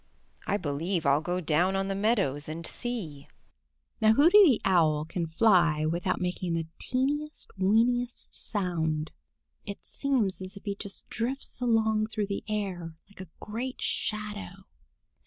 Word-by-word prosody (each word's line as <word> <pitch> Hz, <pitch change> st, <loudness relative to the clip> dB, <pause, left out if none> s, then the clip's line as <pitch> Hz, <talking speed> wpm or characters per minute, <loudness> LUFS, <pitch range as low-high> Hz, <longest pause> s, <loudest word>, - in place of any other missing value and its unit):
I 205 Hz, -, +2 dB
believe 165 Hz, +2 st, -2 dB
I'll 140 Hz, +2 st, +4 dB
go 180 Hz, +2 st, -2 dB
down 175 Hz, +3 st, +2 dB
on 195 Hz, 0 st, 0 dB
the 195 Hz, -, -1 dB
meadows 195 Hz, -, 0 dB
and 165 Hz, +1 st, -5 dB
see." 175 Hz, -, -4 dB, 0.7 s
Now 220 Hz, 0 st, +6 dB
Hooty 335 Hz, -, +7 dB
the 275 Hz, -, +5 dB
Owl 155 Hz, -5 st, +3 dB
can 165 Hz, +1 st, -3 dB
fly 165 Hz, -4 st, +3 dB
without 170 Hz, +3 st, 0 dB
making 180 Hz, -1 st, -2 dB
the 165 Hz, -1 st, -1 dB
teeniest, 290 Hz, +4 st, -2 dB
weeniest 235 Hz, +5 st, +1 dB
sound. 160 Hz, -6 st, -1 dB, 0.5 s
It 200 Hz, -, -8 dB
seems 240 Hz, -10 st, -1 dB
as 185 Hz, +1 st, -7 dB
if -, -, -12 dB
he 200 Hz, -, -1 dB
just 200 Hz, -1 st, -9 dB
drifts 250 Hz, +2 st, -3 dB
along 220 Hz, -2 st, +2 dB
through 215 Hz, -1 st, -2 dB
the 200 Hz, -, -3 dB
air 185 Hz, -6 st, -3 dB
like 200 Hz, -1 st, -13 dB
a 185 Hz, -, -10 dB
great 245 Hz, +5 st, -5 dB
shadow. 210 Hz, -, -4 dB
195 Hz, 145 wpm, -28 LUFS, 165-225 Hz, 0.7 s, Hooty